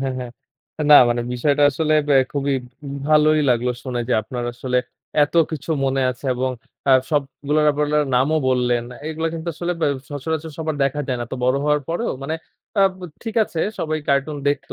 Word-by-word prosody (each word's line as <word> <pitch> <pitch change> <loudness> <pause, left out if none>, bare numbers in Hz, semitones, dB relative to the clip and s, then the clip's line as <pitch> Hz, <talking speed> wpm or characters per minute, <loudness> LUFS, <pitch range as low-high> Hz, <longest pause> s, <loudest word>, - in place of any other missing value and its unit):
হ্যাঁ, 135 -1 -2
হ্যাঁ। 125 -1 -6 0.6
না - - +12
মানে 120 0 0
বিষয়টা 145 +4 +1
আসলে 155 +2 +1 0.2
আ - - +7 0.2
খুবই 140 -1 0 0.5
ভালোই 155 0 +5
লাগলো 125 +1 +1
শুনে। 125 -2 -3
যে, - - +1
আপনার 120 +3 -5
আসলে 125 0 0 0.5
এত 145 - -12 0.2
কিছু 155 +1 -5
মনে 135 0 +1
আছে 125 +2 -10
এবং 130 +1 -1 0.4
আ - - +7 0.2
সবগুলো 145 0 -1
আপনার 150 +1 +1
নামও 145 +5 +2
বললেন। 125 -2 +1 0.2
এগুলো 160 +1 -2
কিন্তু 165 +1 -5
আসলে 175 +2 -2
বে - - +2 0.2
সচরাচর 160 +3 -3
সবার 155 -2 -2
দেখা 140 +2 -1
যায় 125 -2 -1
না। - - -2
তো - - -2
বড় 130 +2 +3
হওয়ার 150 0 +2
পরেও 175 +8 -1
মানে 155 +4 -2 0.5
আ - - +7 0.4
ঠিক 225 -2 -5
আছে 165 - -4 0.2
সবাই 155 -1 -1
কার্টুন 140 +2 +1
দেখতো। 145 - -2
145 Hz, 180 wpm, -21 LUFS, 130-155 Hz, 0.6 s, না